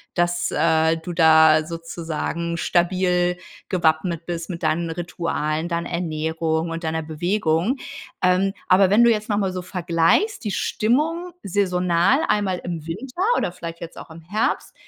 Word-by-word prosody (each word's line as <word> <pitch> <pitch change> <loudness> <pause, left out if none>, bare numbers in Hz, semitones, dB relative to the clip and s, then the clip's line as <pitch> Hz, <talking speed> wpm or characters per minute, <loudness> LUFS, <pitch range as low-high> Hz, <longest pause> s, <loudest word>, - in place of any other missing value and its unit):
dass, 175 0 +1
äh, 160 0 +2
du 170 +2 -7
da 160 -2 +6
sozusagen 165 0 -4
stabil 180 0 +1 0.3
gewappnet 170 -1 0
bist 170 0 -5
mit 170 -2 -6
deinen 170 +1 0
Ritualen, 165 -2 -2
deiner 170 0 -3
Ernährung 160 -1 -2
und 165 +1 -5
deiner 160 0 -2
Bewegung. 170 - 0 0.5
Ähm, 185 +2 +3
aber 185 +1 +5
wenn 210 +4 +5
du 235 - +6
jetzt 215 0 -1
nochmal 200 -3 0
so 185 - -4
vergleichst, 180 - +1
die 210 - -2
Stimmung 320 - 0
saisonal 180 - +2
einmal 200 -4 0
im 170 -3 -5
Winter 250 - -6 0.2
oder - - -1
vielleicht 170 -1 -8
jetzt 170 -1 -9
auch - - -11
im 165 +1 -11
Herbst, 205 +7 -2
175 Hz, 145 wpm, -22 LUFS, 165-190 Hz, 0.5 s, da